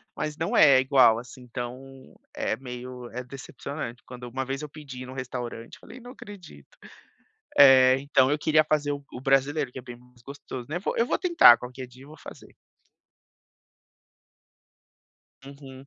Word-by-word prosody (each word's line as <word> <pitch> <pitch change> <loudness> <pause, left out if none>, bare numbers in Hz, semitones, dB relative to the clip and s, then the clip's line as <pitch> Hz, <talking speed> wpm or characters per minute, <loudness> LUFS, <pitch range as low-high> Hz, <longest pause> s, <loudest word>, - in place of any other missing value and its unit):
mas 150 0 -5
não 165 - -2
é 140 -3 +6
igual, 130 -4 +4
assim, 125 +1 -13
então 130 +2 -9 0.2
é - - -2
meio 125 0 -9
é 125 +2 -7
decepcionante, 135 -1 -8
quando, 125 -1 -12
uma 130 +2 -4
vez 135 +2 -5
eu 150 - -7
pedi 135 -4 -10
no 130 - -10
restaurante, 125 -3 -7
eu - - -22
falei: 255 - -13
"Não 245 +1 -12
acredito", 205 - -14 0.8
eh, 130 -1 +7
então, 135 -1 +2
eu 150 - -1
queria 155 0 +3
fazer 150 -1 -1
o 140 -3 -10
brasileiro, 135 +1 +1
que 130 - -7
é - - -10
bem 120 -1 -11
mais 125 -1 -23
gostoso, 130 -2 -9
né, 170 +3 -3
vou, - - -3
eu 230 - +2
vou - - -1
tentar, 340 - +6
qualquer 125 +1 -9
dia 125 +2 -17
eu 140 - -15
vou 155 - -14
fazer. - - -14 2.9
Uhum. 135 -1 -13
135 Hz, 165 wpm, -25 LUFS, 125-145 Hz, 2.9 s, eh